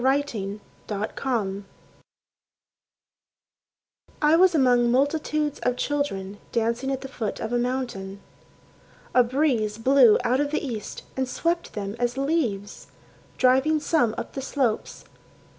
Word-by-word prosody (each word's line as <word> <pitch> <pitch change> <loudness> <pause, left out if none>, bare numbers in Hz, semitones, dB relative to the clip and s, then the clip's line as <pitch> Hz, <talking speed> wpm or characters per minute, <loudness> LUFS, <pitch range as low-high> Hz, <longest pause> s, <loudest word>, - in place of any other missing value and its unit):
Elijah 240 -7 0 0.3
Browning 210 -1 -2 2.6
I 300 +1 +4
was 365 0 +5
among 245 -4 +4
multitudes 295 +3 0
of 250 0 0
children 205 -10 -2
Dancing 235 +3 0
at 270 - -2
the 270 - -6
foot 230 -6 -4
of 225 +2 -4
a 240 - +2
mountain. 240 -6 -3 0.9
A 250 - +6
breeze 240 -5 0
blew 250 -1 +6
out 250 +2 +2
of 290 0 +1
the 305 - -2
east 230 -6 -6
and 260 -1 -1
swept 340 +5 -1
them 200 0 -4
as 245 +1 -1
leaves, 270 -9 -1 0.5
Driving 265 +5 +3
some 290 -8 +1
up - - -6
the 270 - -4
slopes. 260 -4 -2
250 Hz, 125 wpm, -25 LUFS, 220-285 Hz, 2.6 s, A